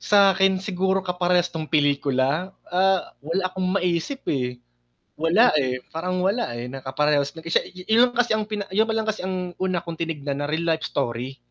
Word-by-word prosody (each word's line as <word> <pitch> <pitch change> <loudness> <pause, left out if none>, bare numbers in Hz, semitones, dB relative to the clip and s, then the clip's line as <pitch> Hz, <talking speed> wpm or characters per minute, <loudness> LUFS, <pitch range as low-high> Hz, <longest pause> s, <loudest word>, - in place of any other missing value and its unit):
Sa 200 -1 +5
'kin 190 0 +4
siguro 190 0 0
kaparehas 180 -1 +1
'tong 155 -2 -4
pelikula? 145 +3 +1 0.2
Ah, 190 +1 +2
wala 165 +6 -1
akong 185 0 -2
maisip 180 - -1
eh. 125 -3 -1 0.6
Wala 175 +10 +4
eh, 130 -1 -1
parang 180 +3 -2
wala 200 - 0
eh, 120 - -4
na 135 0 -7
kaparehas 140 +1 +1
na 160 - -10
siya, 165 - +2 0.3
yun 235 +3 +5
kasi 245 -2 +3
ang 215 - 0
pina 205 -2 -3
yun 220 +2 +3
pa - - +1
lang 220 - 0
kasi 215 0 -1
ang 185 -1 -3
una 185 -2 +1
kong 170 -1 -6
tinignan 145 -4 -3
na 145 - -2
real 160 +2 -1
life 160 -1 +1
story. 120 +3 -3
175 Hz, 190 wpm, -24 LUFS, 145-190 Hz, 0.6 s, Sa